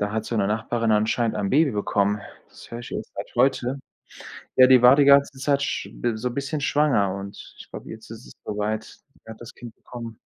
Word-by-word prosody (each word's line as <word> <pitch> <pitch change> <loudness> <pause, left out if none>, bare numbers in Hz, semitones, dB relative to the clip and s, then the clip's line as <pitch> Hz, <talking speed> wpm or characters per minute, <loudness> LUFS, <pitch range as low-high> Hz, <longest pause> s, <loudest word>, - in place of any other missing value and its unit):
da 105 0 -2
hat 110 0 -2
so 115 - -3
'ne 100 -2 +1
Nachbarin 115 +2 -1
anscheinend 110 +2 +1
ein 100 -2 -2
Baby 145 +1 +3
bekommen. 105 0 0 0.3
Das - - -16
höre 115 - -6
ich 120 - -10
erst - - -6
seit - - -7
heute. 130 +1 +1 0.8
Ja, 130 0 +7
die 130 -2 +6
war 125 +2 +8
die 145 - +4
ganze 140 -1 +5
Zeit 140 0 +1
sch - - -3
bi 120 -2 -2
so 125 +3 -2
'n - - -8
bisschen 140 +3 -3
schwanger 135 -10 +2
und 100 0 -8 0.2
ich - - -13
glaube, - - -10
jetzt 110 0 -10
ist 115 +2 -10
es - - -14
so 105 - -5
weit. 105 +1 -2
Sie - - -19
hat 110 - -10
das 120 - -10
Kind 120 -2 -12
bekommen. 115 -2 -10
115 Hz, 235 wpm, -24 LUFS, 105-130 Hz, 0.8 s, war